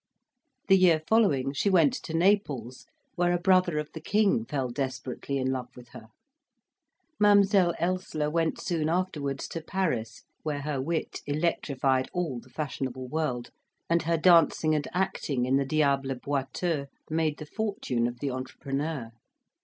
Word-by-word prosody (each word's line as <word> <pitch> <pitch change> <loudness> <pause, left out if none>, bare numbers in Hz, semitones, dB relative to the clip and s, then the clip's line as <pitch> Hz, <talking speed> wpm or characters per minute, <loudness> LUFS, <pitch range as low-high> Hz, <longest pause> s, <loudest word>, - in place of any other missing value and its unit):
The 195 -1 +6
year 170 -4 +4
following 145 - +3
she 175 +8 +1
went 165 -7 +4
to 160 - -6
Naples, 150 - 0 0.3
where 175 0 +1
a - - +2
brother 185 -3 +3
of 150 0 -3
the 160 - -7
King 215 +5 +2
fell 135 - -2
desperately 130 +1 -3
in 130 -1 0
love 130 -2 -3
with 125 -1 -13
her. 110 - -12 1.1
Mademoiselle 200 -4 +5
Elssler 170 -4 -1
went 165 0 0
soon 160 -3 -1
afterwards 160 -6 -2
to 165 - -5
Paris, 155 -11 -2 0.2
where 145 -2 -3
her 145 -3 -2
wit 160 +4 -3
electrified 140 -4 0
all 165 -9 -2
the 130 - -17
fashionable 130 -3 -4
world, 140 -6 -2 0.4
and 170 0 +4
her 165 +1 +1
dancing 160 -2 +4
and 150 -1 0
acting 150 -8 -1
in 130 +2 +2
the 140 - +1
Diable 140 -2 +1
Boiteux 140 +3 -2 0.2
made 155 -2 0
the 155 - -7
fortune 150 - -1
of 120 0 -7
the 140 -2 -1
entrepreneur. 135 0 -4
150 Hz, 150 wpm, -28 LUFS, 135-175 Hz, 1.1 s, The